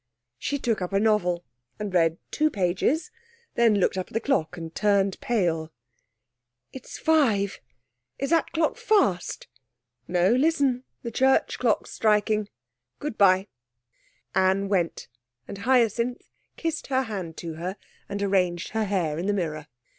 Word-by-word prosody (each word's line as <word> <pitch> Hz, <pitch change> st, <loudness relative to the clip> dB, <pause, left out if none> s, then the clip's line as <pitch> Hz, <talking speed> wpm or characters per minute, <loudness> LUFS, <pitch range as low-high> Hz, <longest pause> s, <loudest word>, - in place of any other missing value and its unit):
She 285 Hz, -, -1 dB
took 230 Hz, -6 st, -1 dB
up 180 Hz, +2 st, -3 dB
a 195 Hz, -, +3 dB
novel 180 Hz, -5 st, +1 dB, 0.3 s
and 210 Hz, -2 st, -5 dB
read 165 Hz, -2 st, +3 dB
two 310 Hz, 0 st, +2 dB
pages, 210 Hz, -, 0 dB, 0.4 s
then 230 Hz, -3 st, +4 dB
looked 190 Hz, -1 st, +1 dB
up 185 Hz, -, -4 dB
at -, -, -18 dB
the 225 Hz, -, +1 dB
clock 175 Hz, -, 0 dB
and 165 Hz, -1 st, -7 dB
turned 200 Hz, -2 st, +2 dB
pale. 170 Hz, -8 st, 0 dB, 1.0 s
'It's 265 Hz, -, -9 dB
five. 225 Hz, -12 st, +2 dB, 0.6 s
Is 275 Hz, -, -3 dB
that 330 Hz, -1 st, +2 dB
clock 320 Hz, +5 st, 0 dB
fast?' 405 Hz, -, +1 dB, 0.6 s
'No; 180 Hz, +2 st, +3 dB
listen, 265 Hz, -1 st, +2 dB, 0.2 s
the 235 Hz, -, -4 dB
church 265 Hz, +3 st, +2 dB
clock's 235 Hz, -4 st, +1 dB
striking. 210 Hz, -1 st, +1 dB, 0.5 s
Good 295 Hz, -6 st, -4 dB
bye.' 190 Hz, -1 st, +4 dB, 0.9 s
Anne 190 Hz, +1 st, +2 dB
went, 180 Hz, -4 st, -1 dB, 0.4 s
and 200 Hz, -, -7 dB
Hyacinth 240 Hz, +1 st, +1 dB, 0.3 s
kissed 325 Hz, -1 st, -3 dB
her 265 Hz, -1 st, +1 dB
hand 190 Hz, -8 st, -6 dB
to 165 Hz, -2 st, -5 dB
her 180 Hz, +5 st, -5 dB, 0.3 s
and 200 Hz, 0 st, -3 dB
arranged 180 Hz, -3 st, +1 dB
her 220 Hz, 0 st, -1 dB
hair 175 Hz, -6 st, -1 dB
in 180 Hz, -, -2 dB
the 205 Hz, -, +2 dB
mirror. 155 Hz, -5 st, -3 dB
205 Hz, 145 wpm, -26 LUFS, 180-250 Hz, 1.0 s, then